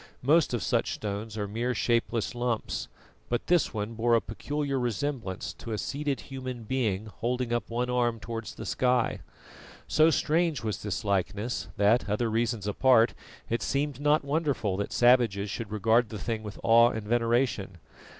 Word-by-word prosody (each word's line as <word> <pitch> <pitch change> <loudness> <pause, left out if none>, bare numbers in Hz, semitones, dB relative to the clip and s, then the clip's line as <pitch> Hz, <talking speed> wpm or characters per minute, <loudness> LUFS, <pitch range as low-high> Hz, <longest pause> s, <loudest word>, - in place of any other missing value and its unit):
Most 155 +5 +4
of 120 -6 -1
such - - 0
stones 105 +1 -5
are 105 -1 -2
mere 120 +4 -2
shapeless 115 0 0
lumps, 120 -2 -2 0.4
but 120 - -1
this 175 -2 +3
one 105 0 -4
bore 115 +1 +2
a - - +5
peculiar 140 +5 -3
resemblance 120 -4 -3
to 115 - -7
a - - -1
seated 140 - -2
human 130 +1 -6
being 110 -4 -1
holding 120 +2 -2
up 120 -3 -1
one 120 +2 -1
arm 120 -2 +1
towards 115 0 -6
the - - -7
sky. 125 -2 +1 0.7
So 155 +1 +5
strange 160 0 +1
was 110 -2 -3
this 105 -1 -3
likeness 100 +3 -1
that, 105 +2 +3
other 110 +2 0
reasons 115 -2 0
apart, 115 +2 +4 0.3
it 115 - -1
seemed 140 -1 -1
not 145 0 +2
wonderful 140 - 0
that 100 - -3
savages 115 -5 +3
should 115 -1 -5
regard 110 +2 +2
the 110 - -6
thing 110 +3 -3
with 105 -1 -8
awe 115 +1 +6
and 110 -3 -5
veneration. 115 -4 +1
115 Hz, 165 wpm, -28 LUFS, 110-125 Hz, 0.7 s, awe